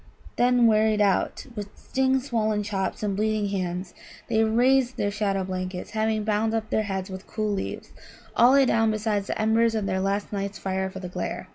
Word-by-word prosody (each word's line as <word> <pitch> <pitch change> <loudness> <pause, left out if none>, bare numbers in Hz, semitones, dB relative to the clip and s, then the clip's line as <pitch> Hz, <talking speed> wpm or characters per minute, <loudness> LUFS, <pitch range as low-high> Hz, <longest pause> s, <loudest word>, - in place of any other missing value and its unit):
Then, 245 0 +4
wearied 215 -1 +3
out, 200 -2 +1
with 205 -2 -5
sting 265 0 +1
swollen 220 -5 0
chops 200 0 -3
and 200 -2 0
bleeding 215 0 0
hands, 180 -2 -3 0.4
they 220 -1 +3
raised 245 +3 +3
their 205 - 0
shadow 200 -2 -1
blankets, 185 0 -5
and 220 - -4
having 220 -1 +1
bound 220 +1 0
up 220 -1 -3
their - - +2
heads 190 0 -3
with 190 +1 -8
cool 215 -1 -2
leaves, 195 - -5 0.4
all 245 +3 +6
lay 275 -1 +6
down 225 -2 +3
beside 215 -2 -1
the - - -4
embers 225 +1 +3
of 215 -2 -1
their 190 -1 -1
last 200 +2 -1
night's 200 0 -3
fire 190 0 -2
for 190 - -8
the 185 - -6
"glare." 180 - -5
210 Hz, 195 wpm, -25 LUFS, 195-225 Hz, 0.4 s, all